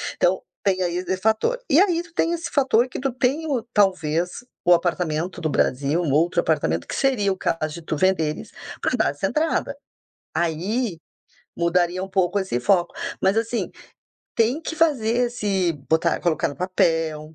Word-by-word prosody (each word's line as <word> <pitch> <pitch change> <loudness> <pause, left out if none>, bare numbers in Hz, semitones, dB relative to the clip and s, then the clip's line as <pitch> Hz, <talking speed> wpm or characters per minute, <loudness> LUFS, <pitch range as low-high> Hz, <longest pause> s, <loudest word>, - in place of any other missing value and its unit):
Então, 185 +1 +2 0.2
tem 190 -2 +2
aí 175 -1 -1
esse 185 +1 -2
fator. 220 - +1
E 300 - +5
aí 350 -4 +2
tu 340 - -19
tem 335 0 +1
esse 340 0 -4
fator 260 -3 +3
que 255 - -6
tu 270 0 -1
tem 265 +6 0
o, 265 -7 -1
talvez, 180 -4 +2 0.3
o 175 - +6
apartamento 175 0 -2
do 155 - 0
Brasil, 140 +5 +1
um 150 - -1
outro 170 +4 +2
apartamento, 85 - 0
que - - -4
seria 230 -8 +2
o 190 - -11
caso 155 -3 -1
de 170 - -8
tu 155 -1 -3
venderes 160 -4 0 0.3
pra - - 0
dar - - +2
essa - - -3
entrada. 315 +1 0 0.6
Aí 175 +5 -1 0.6
mudaria 175 +1 +1
um 195 - -6
pouco 190 0 +1
esse 190 -11 -2
foco. 175 +6 +2 0.3
Mas, 195 +3 +2
assim, 230 +1 -1 0.6
tem 240 +7 +2
que 320 - -5
fazer 250 -7 +2
esse 200 -7 0 0.2
botar 160 +1 +2
colocar 165 -3 +1
no 140 - -8
papel, 160 -3 0
185 Hz, 175 wpm, -23 LUFS, 165-240 Hz, 0.6 s, o